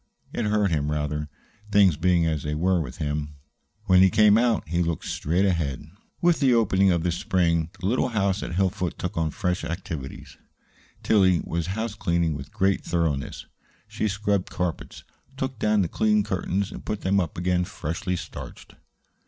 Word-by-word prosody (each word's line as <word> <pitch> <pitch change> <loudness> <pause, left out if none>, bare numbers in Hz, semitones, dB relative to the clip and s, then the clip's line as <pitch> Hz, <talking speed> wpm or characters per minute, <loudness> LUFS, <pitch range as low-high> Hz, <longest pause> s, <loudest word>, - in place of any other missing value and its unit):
It - - -1
hurt 105 -2 +2
him, 75 -2 0
rather 75 0 -2 0.4
things 100 -5 +5
being 85 +1 +2
as 80 -2 0
they 75 +1 -3
were 90 +2 +2
with 65 -4 -7
him. 75 -1 -3 0.5
When 95 -2 +5
he 95 - +7
came 105 +1 +5
out 115 -4 +2
he 85 +2 0
looked 85 -1 -2
straight 85 +6 0
ahead. 80 -8 -1 0.4
With 170 -2 +4
the 130 -4 +4
opening 100 -4 +3
of 85 0 +1
spring 85 -2 +1
the - - -6
little 125 +5 +2
house 100 -4 0
at 85 - -5
Hillfoot 95 -1 0
took 90 +2 -4
on 80 -2 0
fresh 90 +3 -2
activities. 80 -5 -6 0.7
Tillie 95 -5 +4
was 85 0 -2
house 110 -1 -2
cleaning 85 -5 0
with 70 -1 -8
great 95 0 +1
thoroughness. 80 -5 -2 0.4
She 110 - -2
scrubbed 100 -1 -1
carpets, 90 -2 -4 0.3
took 130 -3 -3
down 105 -2 +2
the - - -1
clean 105 +4 +2
curtains, 95 0 -2
and - - -9
put 105 - -4
them 100 +1 +2
up 90 -2 -3
again 90 +1 +1
freshly 90 +2 -3
starched. - - -9
90 Hz, 170 wpm, -25 LUFS, 80-100 Hz, 0.7 s, he